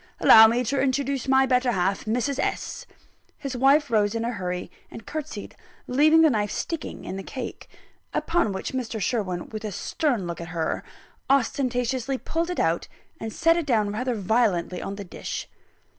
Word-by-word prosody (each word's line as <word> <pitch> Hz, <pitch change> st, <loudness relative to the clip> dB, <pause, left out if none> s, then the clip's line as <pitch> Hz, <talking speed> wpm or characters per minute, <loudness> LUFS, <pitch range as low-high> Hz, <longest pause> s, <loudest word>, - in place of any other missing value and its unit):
"Allow 220 Hz, 0 st, +9 dB
me 235 Hz, +3 st, +1 dB
to 275 Hz, +3 st, 0 dB
introduce 275 Hz, 0 st, 0 dB
my 265 Hz, 0 st, +5 dB
better 250 Hz, -1 st, +2 dB
half, 190 Hz, +1 st, 0 dB
Mrs. 250 Hz, +5 st, -1 dB
S." -, -, -3 dB, 0.5 s
His 275 Hz, -2 st, -5 dB
wife 275 Hz, +2 st, +4 dB
rose 210 Hz, -1 st, +2 dB
in 230 Hz, 0 st, -1 dB
a 240 Hz, -, -1 dB
hurry, 180 Hz, -4 st, -4 dB, 0.2 s
and 225 Hz, -, -10 dB
curtseyed, 310 Hz, -1 st, -6 dB, 0.3 s
leaving 310 Hz, +5 st, +5 dB
the 315 Hz, -, +6 dB
knife 210 Hz, -3 st, 0 dB
sticking 330 Hz, -, -4 dB
in 190 Hz, -, -5 dB
the -, -, -4 dB
cake; 255 Hz, +3 st, -7 dB, 0.4 s
upon 330 Hz, -11 st, +1 dB
which 190 Hz, +5 st, -4 dB
Mr. 235 Hz, -4 st, -3 dB
Sherwin, 190 Hz, -4 st, -2 dB
with 215 Hz, 0 st, -6 dB
a 215 Hz, -, -3 dB
stern 245 Hz, -, -1 dB
look 170 Hz, 0 st, -5 dB
at 170 Hz, -, -6 dB
her, 160 Hz, -1 st, -1 dB, 0.5 s
ostentatiously 255 Hz, -1 st, +1 dB
pulled 330 Hz, +5 st, -2 dB
it 360 Hz, -, -3 dB
out, -, -, +1 dB, 0.3 s
and 225 Hz, -, -5 dB
set 330 Hz, +7 st, +3 dB
it 335 Hz, -3 st, -2 dB
down 215 Hz, -5 st, +2 dB
rather 245 Hz, +4 st, -2 dB
violently 200 Hz, -4 st, +1 dB
on 195 Hz, -, -5 dB
the 200 Hz, -, -6 dB
dish. 175 Hz, -, -6 dB
245 Hz, 175 wpm, -25 LUFS, 205-275 Hz, 0.5 s, Allow